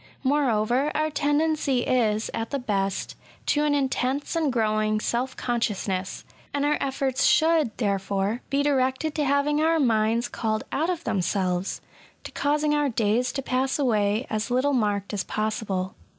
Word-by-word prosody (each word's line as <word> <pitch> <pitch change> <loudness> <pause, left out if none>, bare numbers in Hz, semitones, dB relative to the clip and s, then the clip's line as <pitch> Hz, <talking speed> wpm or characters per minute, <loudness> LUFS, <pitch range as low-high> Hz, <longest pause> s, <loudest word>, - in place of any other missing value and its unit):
Moreover, 260 -1 +2
our 310 +1 0
tendency 295 -3 +1
is, 225 -4 +1
at 225 0 -3
the 280 - -1
best, 200 -6 -2 0.3
to 295 - +2
an 290 -1 +2
intense 270 +1 -1
and 315 -4 +1
growing 215 -2 +1
self 250 +4 -2
conscious 235 -5 -1
ness, 185 -1 -3 0.3
and 285 0 +1
our 295 +1 +1
efforts 270 -1 -1
should, 315 -7 +3
therefore, 200 +1 -1
be 280 +1 +1
directed 275 +2 +1
to 300 - 0
having 285 +2 +2
our 325 +1 +3
minds 230 -2 +2
called 215 -1 -2
out 320 +5 0
of 345 -2 -2
themselves 185 -1 -1 0.2
— - - -29
^to - - -9
causing 295 +1 +1
our 295 -1 +2
days 230 +2 +1
to 275 - -3
pass 260 +1 0
away 215 -4 +1
as 215 +2 -2
little 255 +4 +1
marked 205 -4 0
as 200 -2 -1
possible. 215 -4 -2
250 Hz, 160 wpm, -25 LUFS, 215-285 Hz, 0.3 s, should